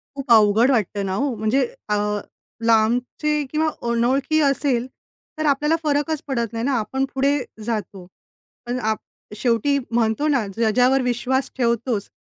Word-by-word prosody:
खूप 275 -3 -5
अवघड 220 +3 +5
वाटतं 205 -4 0
ना 190 - -2
हो 275 +5 0
म्हणजे 220 +5 +1 0.2
अ, 210 - +2 0.7
लांबचे 245 +7 +1
किंवा 310 +1 +1 0.2
अनोळखी 260 +6 +1
असेल, 275 -4 +1 0.5
तर 310 - -2
आपल्याला 295 +2 +2
फरकच 295 0 0
पडत 235 -5 -2
नाही 230 +1 -2
ना? 280 - +1
आपण 265 +5 -1
पुढे 275 +2 +2 0.3
जातो. 210 -5 -4 0.6
पण 245 +1 -2
आप 215 - -3 0.4
शेवटी 240 +5 +1
म्हणतो 230 +4 +1
ना 270 -7 +2
ज्याच्यावर 245 +4 +3
विश्वास 250 +2 -1
ठेवतोस, 235 -3 0
245 Hz, 135 wpm, -22 LUFS, 225-275 Hz, 0.7 s, अवघड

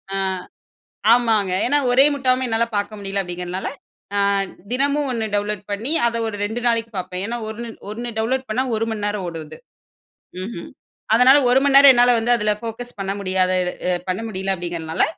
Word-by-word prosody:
ஆ. - - 0 0.9
ஆமாங்க 225 -5 +3
ஏன்னா 285 +4 +2
ஒரே 260 +2 +6
முட்டாமே 260 -2 +1
என்னால 225 0 +1
பாக்க 205 +1 -1
முடியல 195 0 -2
அப்டீங்குறதுனால, 180 +1 -5 0.5
அ - - +1 0.5
தினமும் 280 +2 +1
1 230 -2 -2
டவுன்லோட் 205 -1 -1
பண்ணி, 225 +8 -2 0.2
அத 235 - -2
ஒரு 220 - -4
2 225 +3 -4
நாளைக்கு 230 -1 0
பாப்பேன். 185 0 -4
ஏன்னா 235 +3 -3
1, 235 +2 -6 0.2
1 235 +3 -5
டவுன்லோட் 255 +4 -1
பண்ணா 245 +4 0
1 225 +1 0
மணிநேரம் 205 -2 -2
ஓடும் 165 -2 -6
அது. 155 - -11 0.9
ம்ஹ்ம். 190 -3 -7 0.5
அதனால, 255 +4 +7
1 260 +2 +5
மணிநேரம் 275 0 +8
என்னால 245 0 +5
வந்து 235 +2 +1
அதுல 210 -1 +1
ஃபோக்கஸ் 235 +1 -7
பண்ண 195 0 -2
முடியாத 185 -1 +1 0.4
அ - - +3 0.2
பண்ண 185 +4 -1
முடியல 195 -2 -1
அப்டீங்குறனால, 170 -2 -1
220 Hz, 165 wpm, -21 LUFS, 195-245 Hz, 0.9 s, மணிநேரம்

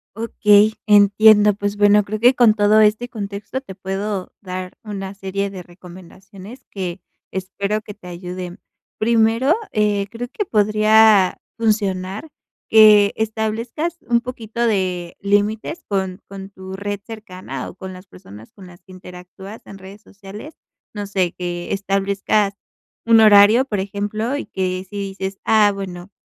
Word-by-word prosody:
Okey, 215 -1 +3
entiendo, 210 0 +6
pues 205 +1 -4
bueno, 205 0 +5
creo 210 +2 -5
que 245 +4 +5
con 235 -4 +4
todo 210 0 +4
este 215 +3 +2
contexto 205 +2 -6
te 195 -8 -11
puedo 195 0 -4
dar 185 -1 -6
una 195 -3 -6
serie 195 0 -4
de 190 -2 -8
recomendaciones 185 +6 -14
que 185 -2 -5 0.3
espero 200 +3 -3
que 210 - -10
te 195 -3 -15
ayuden. 180 +1 -7 0.4
Primero, 230 +5 +2 0.2
eh, 205 -2 +1
creo 235 +3 -6
que 415 - -3
podría 215 - +4 0.2
funcionar 205 +2 -1 0.4
que 210 -2 +6
establezcas 225 +9 -3
un 235 -1 +3
poquito 235 -1 -4
de 185 -5 -1
límites 210 - -1
con 190 -2 -2
con 195 0 -9
tu 190 -1 -10
red 205 +1 -4
cercana 185 - -8
o - - -13
con 190 0 -8
las 185 +1 -13
personas 100 - -14
con 190 -2 -14
las 175 -1 -16
que 185 - -17
interactúas 185 +3 -12
en 195 - -11
redes 195 +2 -13
sociales. 205 +9 -12 0.4
No 205 0 -4
sé, 190 -3 -1
que 175 -1 -5
establezcas 200 +1 0 0.5
un 230 -1 +6
horario, 215 +3 +6
por 210 -7 -3
ejemplo, 205 +5 -3
y 290 - -4
que 185 0 -3
si 205 - -8
dices: 195 -1 -5
"Ah, 215 -2 +4
bueno, 185 -2 -7
200 Hz, 145 wpm, -20 LUFS, 190-215 Hz, 0.5 s, entiendo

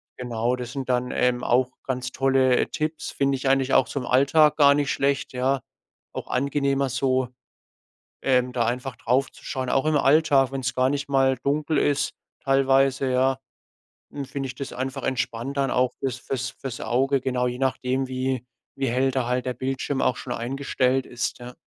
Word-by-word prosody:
Genau, 120 0 -1
das 125 -1 -6
sind 135 -1 -5
dann, 125 0 0
ähm, 125 0 +1
auch 125 +1 +3 0.2
ganz 125 -1 -3
tolle, 135 -1 +3
äh, - - +1
Tipps. 155 +1 -3
Finde 140 0 +1
ich 135 0 -1
eigentlich 135 0 +2
auch 125 - +4
zum 140 -3 -3
Alltag 140 +4 +4
gar 140 -2 +6
nicht 145 -1 0
schlecht, 140 -1 0
ja. 130 +2 +1 0.5
Auch - - -6
angenehmer 140 +1 0
so, 130 0 +1 1.0
ähm, 125 -1 +2
da 120 -2 +1
einfach 125 +2 -3
draufzuschauen. 130 +1 -2
Auch 135 +3 +1
im 155 -1 +3
Alltag, 140 -2 +4
wenn's 130 -2 -2
gar 130 0 +2
nicht 145 0 -2
mal 135 -1 +3
dunkel 150 +2 0
ist 145 0 +1 0.3
teilweise, 135 -1 +3
ja, 130 +1 +2 0.7
n 140 -1 -5
finde 135 0 -4
ich 125 - -7
das 140 - -6
einfach 130 +1 -4
entspannt 125 +1 -2
dann 135 -1 +1
auch 125 0 +2
für's 130 -2 -2
für's 125 -1 -3
für's 130 -3 -7
Auge, 135 +2 +1
genau. 125 -1 0
Je 125 +1 -4
nachdem, 130 0 0
wie 130 -1 -2 0.3
wie 135 -1 -1
hell 130 +3 +2
da 130 -2 -1
halt 125 0 -1
der 125 - -1
Bildschirm 135 +2 -2
auch 125 - +1
schon 125 - -5
eingestellt 130 +1 0
ist, 120 +1 -3
ja. 125 0 -9
130 Hz, 180 wpm, -24 LUFS, 125-135 Hz, 1.0 s, gar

